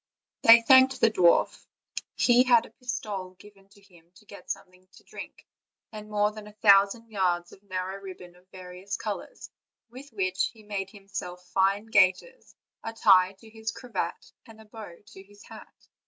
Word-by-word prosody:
They 230 0 +8
thanked 260 +1 +5
the 225 - +3
dwarf; 175 -5 +2 0.5
he 245 0 +4
had 240 -2 +4
a - - -16
pistole 205 -7 -6
given 200 0 -19
to 200 0 -22
him 175 -4 -23
to 210 - -20
get 200 - -14
something 185 -2 -8
to - - -19
drink, - - -11 0.5
and 215 -1 -10
more 210 0 +1
than 215 -1 -11
a 210 - -15
thou 200 -2 +7
sand 230 +3 -11
yards 175 -4 -1
of 190 - -17
narrow 190 0 -6
ribbon 180 -2 -11
of 180 +1 -25
various 185 +2 -8
colors, 215 - -7 0.4
with 265 +4 -12
which 185 -3 -1
he 220 -2 -16
made 200 -2 -5
himself 195 -3 -9
fine 195 +2 +1
gaiters, 215 - +1 0.3
a 225 - -6
tie 190 -4 +4
to 225 - -15
his 220 0 -5
cravat, 250 -3 -6 0.2
and 225 -1 -15
a 220 - -15
bow 210 -5 -11
to 190 - -14
his 205 +1 -19
hat. - - -13
200 Hz, 175 wpm, -26 LUFS, 185-220 Hz, 0.5 s, They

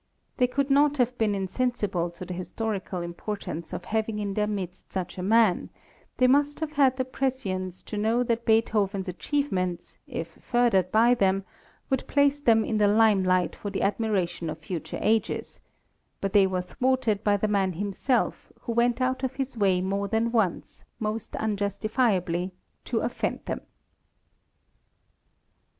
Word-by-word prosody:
They 250 - +4
could 275 +2 -1
not 290 +1 +4
have 250 -1 +1
been 215 -2 +2
insensible 195 -3 -1
to 170 +2 -9
the 180 - -5
historical 185 0 -3
importance 170 -2 -5
of - - -5
having 220 0 -1
in 205 -1 -2
their 210 +1 0
midst 190 -4 -5
such 185 -2 -3
a - - -2
man; 215 -1 +3 0.5
they 255 - +4
must 285 +3 +3
have 315 -2 -3
had 275 -3 +3
the 260 - 0
prescience 195 -9 -3
to 210 - -6
know 225 +3 +2
that 235 -1 -1
Beethoven's 210 -4 +1
achievements, 185 - -2
if 165 0 -6
furthered 230 -7 +2
by 230 +3 +5
them, 195 -4 +1 0.5
would 265 - 0
place 285 0 +3
them 225 -5 +4
in 215 - 0
the 205 - +5
lime 210 -2 +4
light 185 -1 +2
for 205 - -5
the 200 - -2
admiration 195 -5 0
of 155 - -4
future 160 +1 -5
ages; 220 +1 0 0.6
but 195 -1 -2
they 200 -2 +6
were 185 -1 -1
thwarted 240 0 0
by 205 -1 +3
the 215 - 0
man 195 -3 +1
himself, 205 - -1
who 235 - -4
went 235 +2 +2
out 260 0 0
of 260 0 -2
his 270 -1 -3
way 195 -4 +2
more 200 +2 -1
than 225 +2 0
once, 220 -7 -1 0.2
most 215 0 -3
unjustifiably, 200 -3 0 0.3
to - - -1
offend - - -2
them. - - -3
210 Hz, 160 wpm, -27 LUFS, 190-245 Hz, 0.6 s, they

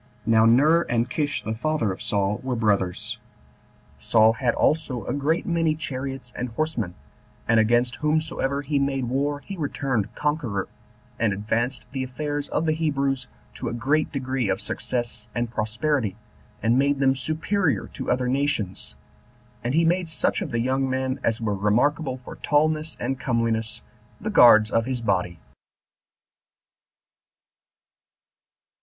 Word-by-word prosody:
Now 110 0 +5
Ner, 150 +8 +5
and 120 0 +1
Kish 145 0 -1
the 110 - -2
father 150 -2 0
of 95 - -7
Saul, 100 0 0
were 130 -1 -2
brothers. 100 -5 0 0.8
Saul 110 0 +4
had 120 +1 0
also 150 -6 +1
a - - -2
great 145 +4 0
many 165 -2 +1
chariots 135 -4 -5
and 125 +1 -3
horsemen, 115 - -2 0.5
and 115 -1 +4
against 120 +2 +2
whomsoever 150 -2 0
he 145 0 0
made 135 -2 0
war 140 +4 -1
he 195 - -7
returned 135 - -2
conqueror, 145 -10 -1 0.5
and 110 -2 +2
advanced 115 +5 -1
the 135 -1 -2
affairs 145 +3 -3
of 165 - 0
the 160 - +2
Hebrews 140 -5 0 0.3
to 120 - -4
a - - -4
great 140 +6 +1
degree 130 -5 -1
of - - 0
success 120 -1 -3
and 120 -1 -1
prosperity, 115 0 0 0.5
and 115 +3 +3
made 140 +1 +2
them 135 -1 +4
superior 155 - 0
to - - -5
other 125 0 +1
nations; 130 -8 -1 0.7
and 125 +4 -1
he 165 +1 +4
made 175 0 +1
such 160 - +1
of - - -3
the 120 -1 -1
young 130 +2 0
men 130 0 -1
as 115 0 +1
were 110 -3 -1
remarkable 125 +8 +1
for 125 - -11
tallness 155 +1 +1
and 135 -1 -2
comeliness 115 -3 -1 0.4
the - - -3
guards 110 -3 +7
of 115 +1 +1
his 130 -2 -1
body. 90 -6 0
130 Hz, 145 wpm, -24 LUFS, 115-145 Hz, 0.8 s, guards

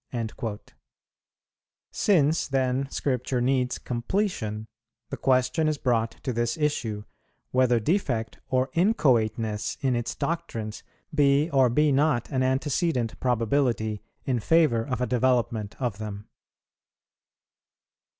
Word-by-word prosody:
"[62:1] 115 -2 -4 1.3
Since 160 -6 +2
then 135 0 0
Scripture 125 -2 -1
needs 125 0 +1
completion, 120 - -2 0.5
the - - -3
question 130 +5 +2
is 155 -1 0
brought 115 -4 +1
to 130 - -2
this 120 +3 -1
issue, 125 -9 -1 0.5
whether 125 -2 +3
defect 125 - -1
or 130 0 +1
inchoateness 115 - +1
in 130 -3 +1
its 120 -1 -3
doctrines 115 -11 -3 0.3
be 145 +2 +3
or 135 -3 +4
be 150 +5 +3
not 140 -3 +1
an 130 -2 0
antecedent 130 -1 0
probability 115 -3 0 0.2
in 125 -3 0
favour 150 -3 +3
of 125 0 -3
a - - +2
development 120 -4 0
of 120 -6 -2
them. 105 -1 -6
125 Hz, 110 wpm, -26 LUFS, 115-145 Hz, 1.3 s, or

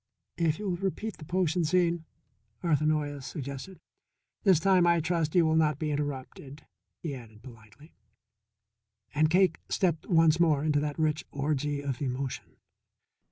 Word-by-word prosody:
"If 160 -2 +1
you 210 - -5
will 180 -2 -1
repeat 195 +3 -3
the 155 - -10
potion 175 0 +1
scene," 170 0 +1 0.6
Arthur 155 -3 +2
Noyes 145 -3 -1
suggested. 140 +5 -7 0.7
"This 190 -7 +5
time, 185 0 +4
I 170 0 +4
trust, 165 -1 -1
you 175 -2 +5
will 160 0 +2
not 155 -3 +2
be 155 0 -2
interrupted," 145 0 -5 0.4
he 160 -4 -3
added 110 -4 -11
politely. 115 +4 -15 1.2
And 155 +1 +3
Cake 180 0 +3
stepped 170 -4 0
once 165 -2 +4
more 155 -4 +3
into 150 -2 +2
that 145 0 -3
rich 155 -1 0
orgy 145 0 -1
of 135 -2 -3
emotion. 130 -1 -4
155 Hz, 150 wpm, -29 LUFS, 145-170 Hz, 1.2 s, This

